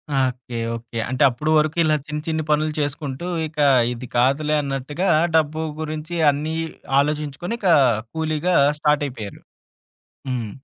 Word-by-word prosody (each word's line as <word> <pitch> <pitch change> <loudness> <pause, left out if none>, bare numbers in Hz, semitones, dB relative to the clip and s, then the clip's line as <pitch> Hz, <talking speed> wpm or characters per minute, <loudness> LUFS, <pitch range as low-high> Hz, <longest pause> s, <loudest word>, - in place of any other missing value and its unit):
Okay! 125 -2 -1 0.2
Okay. 115 0 -7
అంటే 130 +3 +1
అప్పుడు 140 +6 -2
వరకు 155 +2 +1
ఇలా 155 -1 +3
చిన్ని, 150 0 -4
చిన్ని 160 -1 -1
పనులు 155 +1 +2
చేసుకుంటూ, 145 +1 -3 0.2
ఇక 155 0 -18 0.4
ఇది 125 +1 -8
కాదులే 140 +5 +2
అన్నట్టుగా 140 +6 -3 0.3
డబ్బు 155 0 +2 0.2
గురించి 155 +1 -5 0.2
అన్నీ, 150 +3 -1 0.4
ఆలోచించుకొని 150 +6 -2
ఇక 190 -5 +2 0.4
కూలీగా 160 +2 0 0.2
స్టార్టయిపోయారు. 140 -8 -1 0.9
హ్మ్. 120 -4 -3
150 Hz, 125 wpm, -22 LUFS, 130-155 Hz, 0.9 s, ఇలా